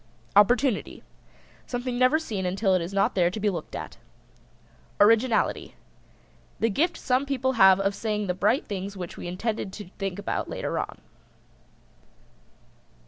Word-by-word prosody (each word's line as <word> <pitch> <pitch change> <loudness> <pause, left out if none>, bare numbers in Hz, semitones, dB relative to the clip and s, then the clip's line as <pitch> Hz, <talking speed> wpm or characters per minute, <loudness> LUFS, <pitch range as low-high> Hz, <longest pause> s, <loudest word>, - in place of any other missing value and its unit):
OPPORTUNITY. 240 +3 +3 0.6
Something 245 0 -3
never 255 +4 +5
seen 220 -12 -4
until 195 +2 +1
it 185 - +2
is 170 +3 -5
not 195 0 +1
there 175 -2 +3
to 185 - -6
be 210 0 +1
looked 175 - -6
at. - - -7 1.0
ORIGINALITY. 225 +2 +3 0.8
The 225 - +2
gift 335 - +1
some 255 +1 +1
people 260 -1 0
have 190 -5 +6
of 195 0 +1
saying 210 0 -2
the 180 - -1
bright 210 +8 +1
things 200 0 -5
which 180 -2 -6
we - - -7
intended 200 +3 -3
to 205 -5 -9
think 195 -2 -3
about 205 - -3
later - - -3
on. - - -5
205 Hz, 145 wpm, -26 LUFS, 190-245 Hz, 1.0 s, have